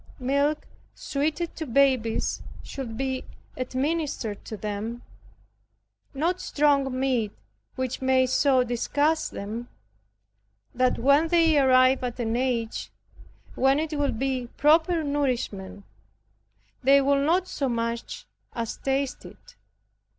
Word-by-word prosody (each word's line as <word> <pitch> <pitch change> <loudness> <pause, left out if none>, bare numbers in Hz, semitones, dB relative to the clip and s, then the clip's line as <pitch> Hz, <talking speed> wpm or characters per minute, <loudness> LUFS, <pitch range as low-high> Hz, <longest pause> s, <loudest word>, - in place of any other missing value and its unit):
Milk 280 +3 0 0.3
suited 305 +4 -2
to 315 - -4
babies 255 -3 +2 0.2
should 240 -5 -6
be 260 0 -2 0.3
administered 260 -4 -2
to 215 - -6
them 215 +3 -5 1.1
not 340 +6 0
strong 275 -3 +1
meat 250 -6 0 0.4
which 260 -1 -3
may 260 0 +3
so 260 0 +3
disgust 290 +6 0
them, 225 +4 -6 1.0
that 255 0 +2
when 280 +6 +4
they 330 -1 +4
arrive 255 -1 +4
at 245 0 -4
an 225 -1 -1
age 240 -3 -2 0.6
when 270 +1 +3
it 315 +1 -2
would 290 -5 0
be 260 -1 -1
proper 320 +3 +4
nourishment, 250 -9 -2 1.0
they 275 +1 +6
will 275 0 +2
not 355 +5 +2
so 275 -6 -2
much 230 0 -3 0.3
as 230 -2 -4
taste 270 0 -2
it. - - -15
265 Hz, 115 wpm, -26 LUFS, 240-290 Hz, 1.1 s, they